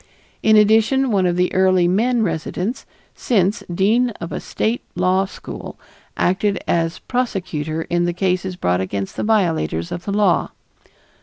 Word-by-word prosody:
In 220 Hz, 0 st, +4 dB
addition, 225 Hz, +5 st, +4 dB
one 190 Hz, -3 st, +2 dB
of 175 Hz, -, 0 dB
the 180 Hz, 0 st, +1 dB
early 185 Hz, -1 st, +3 dB
men 230 Hz, +6 st, +2 dB
residents, 190 Hz, +5 st, -3 dB, 0.3 s
since 205 Hz, -1 st, +1 dB
dean 220 Hz, +8 st, +2 dB
of 170 Hz, -, -6 dB
a -, -, -3 dB
state 230 Hz, +3 st, -2 dB
law 185 Hz, +2 st, +2 dB
school, 195 Hz, -, -9 dB, 0.4 s
acted 195 Hz, +2 st, +1 dB
as 165 Hz, +1 st, 0 dB
prosecutor 175 Hz, -, -3 dB
in 175 Hz, +1 st, 0 dB
the 175 Hz, -, -1 dB
cases 185 Hz, 0 st, -1 dB
brought 90 Hz, -, 0 dB
against 95 Hz, +1 st, -4 dB
the -, -, -3 dB
violators 165 Hz, -, 0 dB
of 175 Hz, -, -5 dB
the 200 Hz, -, -2 dB
law. 200 Hz, -3 st, +2 dB
185 Hz, 150 wpm, -20 LUFS, 175-215 Hz, 0.4 s, In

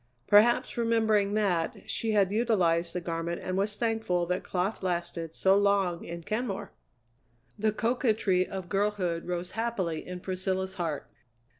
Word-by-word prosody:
Perhaps 225 Hz, +3 st, +4 dB
remembering 220 Hz, -3 st, +2 dB
that, 180 Hz, -6 st, 0 dB
she 225 Hz, -1 st, -1 dB
had 200 Hz, -2 st, +3 dB
utilized 180 Hz, -7 st, +1 dB
the -, -, +1 dB
garment 170 Hz, 0 st, -3 dB
and 185 Hz, -, -3 dB
was 205 Hz, +2 st, 0 dB
thankful 220 Hz, -6 st, 0 dB
that 180 Hz, +2 st, -2 dB
cloth 185 Hz, +4 st, -2 dB
lasted 170 Hz, -3 st, -2 dB
so 190 Hz, 0 st, +4 dB
long 200 Hz, -4 st, +2 dB
in 170 Hz, 0 st, -7 dB
Kenmore! 215 Hz, 0 st, -3 dB, 0.9 s
The 215 Hz, +1 st, +2 dB
coquetry 220 Hz, -5 st, +1 dB
of 190 Hz, -2 st, -6 dB
girlhood 195 Hz, -4 st, -1 dB
rose 180 Hz, 0 st, -3 dB
happily 205 Hz, -8 st, -2 dB
in 180 Hz, 0 st, -5 dB
Priscilla's 190 Hz, +1 st, -2 dB
heart. 165 Hz, -6 st, -3 dB
190 Hz, 140 wpm, -29 LUFS, 175-215 Hz, 0.9 s, Perhaps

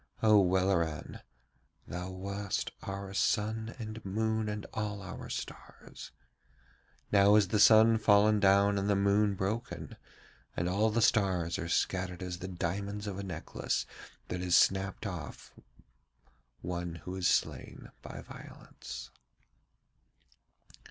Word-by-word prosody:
O 110 Hz, -1 st, +7 dB
Welleran, 90 Hz, -4 st, 0 dB, 0.7 s
thou 90 Hz, +1 st, -5 dB
wast 100 Hz, +1 st, -3 dB
our 100 Hz, 0 st, -6 dB
sun 110 Hz, +3 st, 0 dB
and 110 Hz, -1 st, -7 dB
moon 110 Hz, +2 st, -1 dB
and 105 Hz, -1 st, -4 dB
all 105 Hz, -2 st, -3 dB
our 95 Hz, -, -8 dB
stars. -, -, -8 dB, 1.0 s
Now 100 Hz, 0 st, +6 dB
is 105 Hz, -3 st, +4 dB
the 105 Hz, -, +1 dB
sun 110 Hz, +1 st, +7 dB
fallen 105 Hz, 0 st, +4 dB
down 100 Hz, 0 st, +4 dB
and 100 Hz, +1 st, -1 dB
the 100 Hz, -, +3 dB
moon 100 Hz, +1 st, +2 dB
broken, 110 Hz, +6 st, -4 dB, 0.6 s
and 85 Hz, -, 0 dB
all 100 Hz, +5 st, +2 dB
the 115 Hz, +1 st, +1 dB
stars 90 Hz, -7 st, +2 dB
are 85 Hz, -, -4 dB
scattered 90 Hz, +1 st, -1 dB
as 90 Hz, -1 st, -5 dB
the 95 Hz, -, -6 dB
diamonds 100 Hz, +3 st, -3 dB
of 100 Hz, -2 st, -5 dB
a -, -, -4 dB
necklace 90 Hz, -4 st, -3 dB, 0.4 s
that 90 Hz, -, -3 dB
is 90 Hz, -1 st, +4 dB
snapped 95 Hz, +3 st, +2 dB
off 90 Hz, -4 st, -7 dB, 1.1 s
one 85 Hz, -1 st, -4 dB
who 90 Hz, -, -5 dB
is 90 Hz, -2 st, 0 dB
slain -, -, -1 dB
by -, -, -8 dB
violence.' -, -, -10 dB
100 Hz, 125 wpm, -31 LUFS, 90-105 Hz, 1.1 s, O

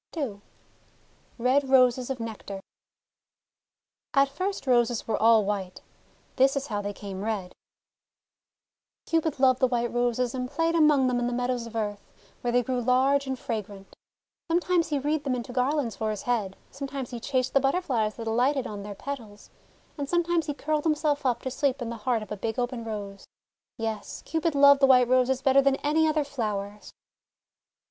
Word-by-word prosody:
n 225 Hz, -10 st, -3 dB, 1.0 s
RED 260 Hz, +3 st, +2 dB
ROSES 255 Hz, -1 st, +4 dB
OF 265 Hz, -2 st, -3 dB
NECTAR 215 Hz, -3 st, -6 dB, 1.6 s
AT 275 Hz, 0 st, +5 dB
first 370 Hz, +7 st, -3 dB
Roses 240 Hz, -2 st, +2 dB
were 225 Hz, -, -1 dB
all 225 Hz, -2 st, +5 dB
white. 195 Hz, -3 st, -3 dB, 0.6 s
This 270 Hz, +1 st, +4 dB
is 275 Hz, 0 st, -1 dB
how 210 Hz, -6 st, -3 dB
they 205 Hz, 0 st, -3 dB
came 195 Hz, -1 st, -7 dB
red: 205 Hz, -5 st, -3 dB, 0.8 s
— -, -, -66 dB
Cupid 320 Hz, -4 st, 0 dB
loved 260 Hz, -1 st, +4 dB
the 260 Hz, -, +4 dB
White 240 Hz, -1 st, -1 dB
Roses 240 Hz, 0 st, 0 dB
and 250 Hz, -1 st, -3 dB
played 330 Hz, +3 st, 0 dB
among 300 Hz, -5 st, +4 dB
them 250 Hz, -1 st, +1 dB
in 240 Hz, -, 0 dB
the -, -, -1 dB
meadows 245 Hz, -1 st, -1 dB
of 230 Hz, -, -11 dB
earth, 205 Hz, -2 st, -3 dB, 0.4 s
where 240 Hz, -, -1 dB
they 245 Hz, +1 st, +3 dB
grew 250 Hz, 0 st, -1 dB
large 265 Hz, +3 st, +2 dB
and 265 Hz, 0 st, -2 dB
fragrant. 205 Hz, -5 st, -6 dB, 0.5 s
Sometimes 345 Hz, 0 st, +2 dB
he 295 Hz, -, -1 dB
wreathed 295 Hz, +2 st, -1 dB
them 265 Hz, -2 st, 0 dB
into 245 Hz, 0 st, -6 dB
garlands 255 Hz, -1 st, 0 dB
for 220 Hz, -1 st, -1 dB
his 210 Hz, -2 st, -4 dB
head, 215 Hz, -6 st, -1 dB
some 275 Hz, -, -6 dB
times 270 Hz, -2 st, -6 dB
he 240 Hz, -, -5 dB
chased 260 Hz, +1 st, -1 dB
the 275 Hz, -, +5 dB
Butterflies 270 Hz, -7 st, 0 dB
that 230 Hz, -, -7 dB
alighted 250 Hz, +4 st, +1 dB
on 205 Hz, -4 st, -6 dB
their 205 Hz, 0 st, -7 dB
petals, 225 Hz, -5 st, -8 dB, 0.5 s
and 280 Hz, -1 st, -3 dB
sometimes 345 Hz, -2 st, +1 dB
he 290 Hz, -, -2 dB
curled 305 Hz, +1 st, -1 dB
himself 300 Hz, -3 st, +1 dB
up 240 Hz, -2 st, -1 dB
to 260 Hz, -, -3 dB
sleep 275 Hz, 0 st, 0 dB
in 235 Hz, -2 st, -4 dB
the 235 Hz, -, -5 dB
heart 235 Hz, -4 st, +1 dB
of 215 Hz, -, -13 dB
a 210 Hz, -, -3 dB
big 220 Hz, +4 st, -3 dB
open 245 Hz, -1 st, -2 dB
Rose. 205 Hz, -3 st, -7 dB, 0.5 s
Yes, 225 Hz, -3 st, -5 dB
Cupid 320 Hz, -1 st, -1 dB
loved 280 Hz, 0 st, +7 dB
the 270 Hz, -, +5 dB
White 250 Hz, -2 st, +6 dB
Roses 255 Hz, +1 st, +2 dB
better 275 Hz, 0 st, +5 dB
than 275 Hz, 0 st, +3 dB
any 315 Hz, +2 st, +3 dB
other 310 Hz, -1 st, +1 dB
flowers. 210 Hz, -7 st, -4 dB
250 Hz, 185 wpm, -27 LUFS, 225-280 Hz, 1.6 s, loved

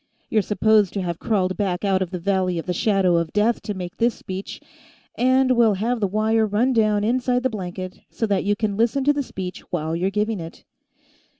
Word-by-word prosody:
you're 215 Hz, -, +3 dB
supposed 210 Hz, -1 st, +3 dB
to 200 Hz, -, -2 dB
have 170 Hz, -2 st, -3 dB
crawled 185 Hz, -4 st, 0 dB
back 190 Hz, -2 st, -1 dB
out 190 Hz, -1 st, +2 dB
of 185 Hz, -, -1 dB
the 180 Hz, -, -4 dB
Valley 185 Hz, 0 st, 0 dB
of 165 Hz, -, -4 dB
the 180 Hz, -, -1 dB
Shadow 190 Hz, -2 st, +2 dB
of 170 Hz, -1 st, -1 dB
Death 215 Hz, +3 st, +2 dB
to 210 Hz, -, -5 dB
make 180 Hz, -2 st, -7 dB
this 235 Hz, 0 st, +2 dB
speech... 190 Hz, +1 st, -7 dB, 0.5 s
and 260 Hz, +1 st, +3 dB
we'll 235 Hz, -4 st, +4 dB
have 230 Hz, +5 st, -1 dB
the 205 Hz, -, +1 dB
wire 220 Hz, +2 st, +1 dB
run 230 Hz, +6 st, +1 dB
down 215 Hz, -3 st, +2 dB
inside 250 Hz, +2 st, +1 dB
the 260 Hz, -, +1 dB
blanket, 185 Hz, -2 st, -6 dB
so 225 Hz, -, -2 dB
that 200 Hz, -3 st, 0 dB
you 205 Hz, +1 st, +1 dB
can 205 Hz, -1 st, -1 dB
listen 235 Hz, +4 st, +1 dB
to 290 Hz, +2 st, +4 dB
the 290 Hz, -, -1 dB
speech 185 Hz, -8 st, -6 dB
while 160 Hz, -2 st, -2 dB
you're 180 Hz, +3 st, 0 dB
giving 210 Hz, +1 st, -1 dB
it. 165 Hz, 0 st, -9 dB
205 Hz, 215 wpm, -22 LUFS, 185-225 Hz, 0.5 s, we'll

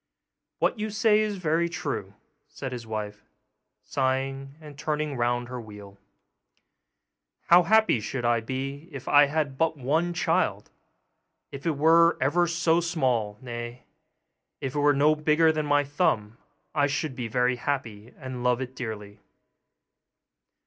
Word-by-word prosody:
'What -, -, 0 dB
you 215 Hz, +1 st, -2 dB
say 215 Hz, 0 st, +3 dB
is 210 Hz, -2 st, -1 dB
very 170 Hz, -1 st, 0 dB
true,' -, -, -4 dB, 0.3 s
said 135 Hz, -, -7 dB
the 120 Hz, -2 st, -7 dB
wife, 105 Hz, -1 st, -5 dB, 0.6 s
sighing, 135 Hz, +1 st, -2 dB
and 150 Hz, -2 st, -12 dB
turning 150 Hz, 0 st, -2 dB
round 120 Hz, 0 st, 0 dB
her 125 Hz, -1 st, -6 dB
wheel; 105 Hz, -2 st, -12 dB, 1.5 s
'how 175 Hz, +1 st, +8 dB
happy 220 Hz, -, +3 dB
should 120 Hz, +3 st, -4 dB
I 120 Hz, 0 st, +3 dB
be 135 Hz, +6 st, -5 dB
if 135 Hz, -2 st, -9 dB
I 145 Hz, 0 st, +7 dB
had 145 Hz, -2 st, -2 dB
but 160 Hz, -1 st, +1 dB
one 155 Hz, +7 st, 0 dB
child! 175 Hz, -, 0 dB, 0.8 s
If 140 Hz, +3 st, -6 dB
it 155 Hz, -4 st, 0 dB
were 165 Hz, +3 st, +5 dB
ever 170 Hz, +7 st, +2 dB
so 170 Hz, 0 st, +2 dB
small 125 Hz, -11 st, 0 dB
nay, 120 Hz, 0 st, -7 dB, 0.8 s
if 135 Hz, -, -4 dB
it 145 Hz, -, -1 dB
were 145 Hz, 0 st, +4 dB
no 150 Hz, +2 st, +4 dB
bigger 155 Hz, +1 st, +3 dB
than 155 Hz, -1 st, -2 dB
my 145 Hz, 0 st, +3 dB
thumb 120 Hz, -, -1 dB, 0.3 s
I 145 Hz, -2 st, +2 dB
should 145 Hz, -1 st, -2 dB
be 125 Hz, -2 st, -4 dB
very 125 Hz, +2 st, +1 dB
happy, 120 Hz, -5 st, -4 dB
and 130 Hz, -3 st, -7 dB
love 125 Hz, -1 st, +2 dB
it 130 Hz, 0 st, -6 dB
dearly. 105 Hz, -4 st, -7 dB
140 Hz, 145 wpm, -26 LUFS, 120-160 Hz, 1.5 s, how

